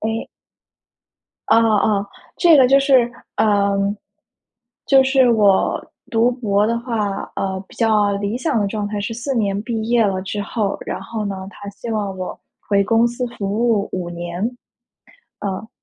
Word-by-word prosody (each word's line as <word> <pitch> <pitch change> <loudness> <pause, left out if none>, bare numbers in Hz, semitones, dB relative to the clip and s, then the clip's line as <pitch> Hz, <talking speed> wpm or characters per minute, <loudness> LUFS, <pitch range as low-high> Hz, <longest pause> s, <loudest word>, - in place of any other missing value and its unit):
诶。 220 +1 -3 1.2
哦 - - +5
哦 230 -1 +3 0.2
哦， 200 -1 0 0.3
这 335 -4 +6
个 260 -2 +6
就 275 +2 +5
是， 260 -4 +4 0.3
嗯， 200 -1 +2 0.9
就 270 -1 +5
是 265 -2 +4
我 205 -4 +3 0.3
读 230 +1 +3
博 210 -4 +1
的 230 - 0
话， 215 -5 -2
呃， 190 0 -2
比 - - -17
较 215 -3 +2
理 205 +3 -2
想 285 -2 0
的 200 - +1
状 205 0 -3
态 205 0 -3
是 215 +3 -3
4 245 +4 -3
年 200 -3 0
毕 225 -1 -3
业 235 -2 +3
了 190 -2 0
之 205 +1 -4
后， 205 -1 -2
然 - - -4
后 220 -2 -5
呢， 190 -1 -5
它 205 0 -10
希 200 +4 -9
望 205 -3 -2
我 185 - -5 0.3
回 200 -1 +3
公 225 +3 +3
司 240 +1 -3
服 200 - -2 0.2
务 205 -3 +1
5 180 -2 -3
年。 175 +2 -5 1.0
嗯。 200 +2 -4
210 Hz, 170 characters per minute, -20 LUFS, 200-235 Hz, 1.2 s, 这